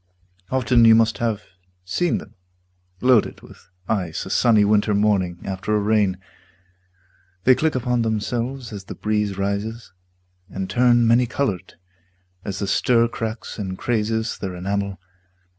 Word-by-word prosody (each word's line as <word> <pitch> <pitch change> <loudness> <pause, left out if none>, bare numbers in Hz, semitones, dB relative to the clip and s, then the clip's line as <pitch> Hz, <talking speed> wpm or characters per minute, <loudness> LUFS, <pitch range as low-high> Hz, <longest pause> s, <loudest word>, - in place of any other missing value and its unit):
Often 125 -2 +3
you 115 0 +8
must 115 0 +2
have 110 -3 -1 0.4
seen 175 - 0
them - - -10 0.7
Loaded 125 -4 +3
with - - -17 0.2
ice 90 -7 -2
a - - -7
sunny 110 -4 +4
winter 105 0 +2
morning 100 -4 +1
After 95 +2 -2
a - - +2
rain. 105 -2 +1 1.3
They 130 - +6
click 155 +3 0
upon 125 -1 0
themselves 115 +3 -2
As 100 -2 -8
the - - -8
breeze 105 -2 -1
rises, 100 +2 -3 0.6
and 95 0 -4
turn 120 +4 +3
many 120 +2 +4
colored 100 -8 -3 0.7
As 95 -2 -4
the 100 - -2
stir 115 +3 +2
cracks 115 -1 -5
and 95 -2 -4
crazes 110 0 -1
their 95 -2 -5
enamel. 100 +2 -3
110 Hz, 140 wpm, -22 LUFS, 100-120 Hz, 1.3 s, you